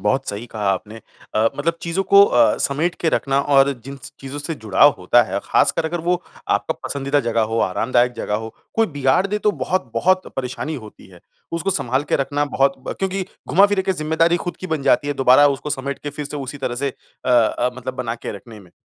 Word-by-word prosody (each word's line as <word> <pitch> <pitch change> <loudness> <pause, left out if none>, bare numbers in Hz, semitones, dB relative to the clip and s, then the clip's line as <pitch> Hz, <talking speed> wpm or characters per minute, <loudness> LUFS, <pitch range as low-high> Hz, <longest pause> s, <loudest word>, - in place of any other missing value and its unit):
बहुत 135 +1 0
सही 105 +4 -5
कहा 105 -3 -3
आपने 105 +4 -5 0.4
अ, 110 +1 +3
मतलब 165 +4 0
चीज़ों 170 +3 -1
को 200 +1 +7
अ, 120 - +3
समेट 160 +6 0
के 165 - +1
रखना 135 -2 +1
और 140 0 +4
जिन 140 +1 -7
स 135 - -12
चीज़ों 135 +1 -7
से 145 +3 -4
जुड़ाव 110 +4 +4
होता 105 +7 +4
है 110 - -3
ख़ासकर 160 - +2
अगर 170 +1 -2
वो 175 +1 0 0.3
आपका - - 0
पसंदीदा 140 +1 0
जगह 115 -2 0
हो, 110 +1 0
आरामदायक 120 +5 +1
जगह 105 -3 -3
हो 110 +1 -4 0.2
कोई 225 0 +3
बिगाड़ 145 +5 +1
दे 210 +1 -2
तो 210 - +2
बहुत-बहुत 185 0 0
परेशानी 135 +4 -3
होती 105 - -15
है। 90 -2 -16 0.3
उसको 170 +4 -1
संभाल 130 -7 0
के - - +5
रखना 145 +2 0
बहुत 135 0 +3
ब - - -1
क्योंकि 195 0 -1 0.3
घुमा-फ़िरा 200 0 +4
के 190 - 0
ज़िम्मेदारी 165 +1 +1
खुद 175 +1 -5
की 185 - -5
बन 160 -5 -2
जाती 145 - +2
है 145 - -1
दोबारा 135 +2 +6
उसको 140 +2 -3
समेट 140 +1 -3
के 145 - -6
फ़िर 150 0 -6
से 150 - -6
उसी 140 +1 -6
तरह 125 -2 -3
से 140 +3 -1
अ-अ, 125 -1 0
मतलब 130 0 -5
बना 120 -3 -3
के 115 - -6
रखने 110 -1 -13
में। 90 -3 -18
140 Hz, 215 wpm, -20 LUFS, 120-165 Hz, 0.4 s, को